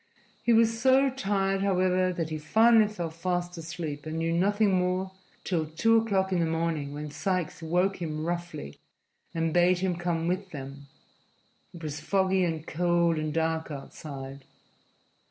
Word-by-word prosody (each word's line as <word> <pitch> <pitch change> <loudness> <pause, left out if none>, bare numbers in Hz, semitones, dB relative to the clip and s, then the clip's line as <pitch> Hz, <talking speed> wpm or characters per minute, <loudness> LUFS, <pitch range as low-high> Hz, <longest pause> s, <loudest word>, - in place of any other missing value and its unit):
He 240 - +2
was 225 0 +3
so 265 +1 +5
tired, 195 -5 0
however, 185 -1 +2
that 165 -3 -3
he 155 - -3
finally 220 +5 +4
went 170 -6 -4
fast 175 +1 -2
asleep 160 -3 -6
and 155 +1 -4
knew 165 0 0
nothing 200 +4 +2
more 185 +1 0 0.3
till 165 -4 -1
two 225 +9 +3
o'clock 195 -4 +1
in 180 - +1
the 165 - +2
morning, 160 -3 -1
when 150 +1 -6
Sikes 180 0 -2
woke 180 +4 0
him 155 -2 -3
roughly 170 - -5 0.6
and 165 -1 0
bade 175 +1 +4
him 180 0 0
come 170 -1 -1
with 185 +2 -2
them. 140 -2 -8 0.8
It 170 -2 -11
was 150 -1 -4
foggy 190 +2 +1
and 160 -2 -2
cold 170 -1 +1
and 155 0 -2
dark 160 +1 -1
outside. 135 -1 -8
175 Hz, 155 wpm, -28 LUFS, 160-190 Hz, 0.8 s, so